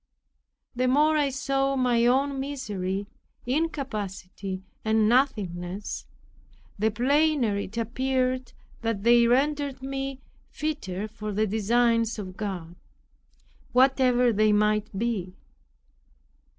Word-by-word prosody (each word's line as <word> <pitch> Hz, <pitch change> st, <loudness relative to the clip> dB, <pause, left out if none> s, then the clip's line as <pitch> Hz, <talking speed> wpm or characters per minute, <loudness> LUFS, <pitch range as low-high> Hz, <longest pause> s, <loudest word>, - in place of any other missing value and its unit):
The 255 Hz, +1 st, +1 dB
more 300 Hz, +4 st, +4 dB
I 290 Hz, -2 st, +2 dB
saw 275 Hz, 0 st, 0 dB
my 245 Hz, -2 st, +3 dB
own 270 Hz, +2 st, +2 dB
misery, 205 Hz, -9 st, -3 dB, 0.4 s
incapacity 210 Hz, -, -3 dB, 0.2 s
and 220 Hz, -1 st, +3 dB
nothingness, 200 Hz, -7 st, -1 dB, 0.7 s
the 220 Hz, +2 st, +3 dB
plainer 265 Hz, 0 st, +2 dB
it 200 Hz, +3 st, -6 dB
appeared 255 Hz, +2 st, -1 dB, 0.3 s
that 225 Hz, -4 st, -2 dB
they 235 Hz, 0 st, +6 dB
rendered 275 Hz, +1 st, +1 dB
me 270 Hz, 0 st, -4 dB, 0.3 s
fitter 215 Hz, -11 st, -3 dB
for 215 Hz, 0 st, -6 dB
the 215 Hz, +2 st, +1 dB
designs 230 Hz, +2 st, +2 dB
of 185 Hz, -3 st, -7 dB
God, 185 Hz, -5 st, -5 dB, 1.0 s
whatever 250 Hz, -2 st, +4 dB
they 215 Hz, +1 st, +3 dB
might 210 Hz, 0 st, +2 dB
be. 195 Hz, -5 st, -2 dB
235 Hz, 100 wpm, -26 LUFS, 210-270 Hz, 1.0 s, they